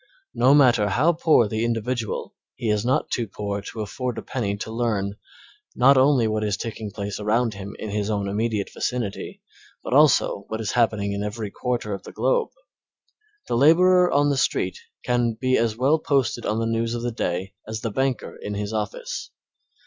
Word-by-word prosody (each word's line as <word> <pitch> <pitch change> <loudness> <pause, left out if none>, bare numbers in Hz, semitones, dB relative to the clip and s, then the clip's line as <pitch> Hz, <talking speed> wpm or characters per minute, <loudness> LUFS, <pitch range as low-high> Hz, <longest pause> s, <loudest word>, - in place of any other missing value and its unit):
No 130 +4 +5
matter 120 -7 +5
how 145 - +3
poor 155 -8 +4
the 110 +2 -2
individual, 115 0 -2 0.2
he 110 - -1
is 105 -1 0
not 125 +2 0
too 120 -2 -1
poor 100 0 -4
to 110 - -7
afford 125 +3 -4
a - - -5
penny 100 -6 -2
to 110 - -6
learn, 110 -4 -1 0.6
not 135 +3 +6
alone 130 -4 +4
what 110 0 -1
is 105 -2 0
taking 110 -2 -5
place 100 0 -5
around 110 +2 +1
him 100 +1 -8
in 110 - -6
his 105 0 -1
own 100 -2 -1
immediate 105 0 -1
vicinity, 120 -6 -4 0.4
but - - -4
also 140 -8 +4
what 110 - -4
is 110 -2 -2
happening 110 -4 +1
in 100 - -3
every 105 0 -4
quarter 120 -4 -2
of 100 - -5
the - - -11
globe. 485 -3 +1 1.0
The - - -1
laborer 180 +7 +5
on 145 0 +3
the 140 - 0
street 135 - 0 0.2
can 120 -1 +1
be 130 +2 +1
as 115 -1 +1
well 140 +6 +3
posted 135 -5 0
on 105 - 0
the 115 - 0
news 115 +1 -1
of 120 - -4
the 120 - -1
day 95 -3 -3
as 110 0 -4
the 115 - -3
banker 130 +2 -1
in 105 - -4
his 105 +1 -3
office. 105 -2 -4
115 Hz, 190 wpm, -24 LUFS, 105-125 Hz, 1.0 s, not